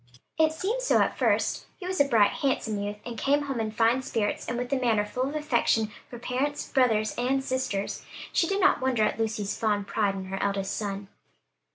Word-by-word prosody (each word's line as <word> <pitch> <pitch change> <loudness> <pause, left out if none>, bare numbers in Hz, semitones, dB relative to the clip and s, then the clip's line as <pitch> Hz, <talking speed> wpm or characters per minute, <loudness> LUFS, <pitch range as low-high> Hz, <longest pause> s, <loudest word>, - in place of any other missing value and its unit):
It 315 0 +5
seemed 395 +10 -2
so - - +3
at - - +2
first. - - +1
He 365 - -8
was 370 -3 +1
a - - +5
bright, 220 -6 +4
handsome 225 -6 -1
youth, 205 +1 -4
and 235 -2 -6
came 285 +1 +2
home 270 -4 -3
in 220 -1 -1
fine 230 +3 +2
spirits, 225 -6 -2
and 235 - -2
with 245 +2 -2
a - - +3
manner 225 -4 +2
full 250 +5 -2
of 295 - -6
affection 240 -7 +1 0.2
for 240 - -8
parents, 260 +5 -2
brothers 225 -6 +2
and 265 +2 +1
sisters. 260 -7 -2 0.3
She 335 - +3
did 395 +2 0
not 385 -6 +4
wonder 255 -4 +2
at 215 - 0
Lucy's 215 -2 -1
fond 210 -2 0
pride 200 -1 0
in 190 -1 -5
her 190 +1 -4
eldest 195 -1 -1
son. 200 -1 -4
240 Hz, 210 wpm, -27 LUFS, 210-275 Hz, 0.3 s, It